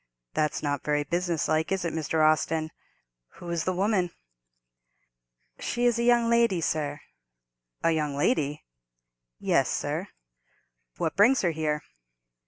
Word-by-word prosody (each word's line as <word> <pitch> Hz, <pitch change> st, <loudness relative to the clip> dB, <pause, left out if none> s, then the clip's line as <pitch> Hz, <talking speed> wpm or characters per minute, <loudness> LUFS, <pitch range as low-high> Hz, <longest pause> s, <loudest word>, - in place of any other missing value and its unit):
That's 150 Hz, 0 st, 0 dB
not 145 Hz, -2 st, -1 dB
very 150 Hz, 0 st, +1 dB
business 170 Hz, +1 st, -1 dB
like, 155 Hz, +2 st, 0 dB
is 190 Hz, -2 st, 0 dB
it, 170 Hz, -, -2 dB
Mr. 160 Hz, 0 st, +1 dB
Austin? 155 Hz, 0 st, +1 dB, 0.6 s
Who 175 Hz, -, -7 dB
is 170 Hz, -2 st, -1 dB
the 185 Hz, -, +1 dB
woman?" 190 Hz, -1 st, +1 dB, 1.5 s
"She 240 Hz, 0 st, -1 dB
is 240 Hz, -1 st, +3 dB
a -, -, +1 dB
young 240 Hz, -1 st, +4 dB
lady, 235 Hz, -5 st, +3 dB
sir." 150 Hz, -2 st, -2 dB, 0.8 s
"A 165 Hz, -, +4 dB
young 150 Hz, -3 st, -1 dB
lady?" 145 Hz, -, 0 dB, 0.7 s
"Yes, -, -, +2 dB
sir." -, -, -2 dB, 0.9 s
"What 160 Hz, -, -1 dB
brings 225 Hz, +6 st, +5 dB
her 175 Hz, -, +2 dB
here?" 155 Hz, -1 st, -2 dB
165 Hz, 135 wpm, -27 LUFS, 150-195 Hz, 1.5 s, brings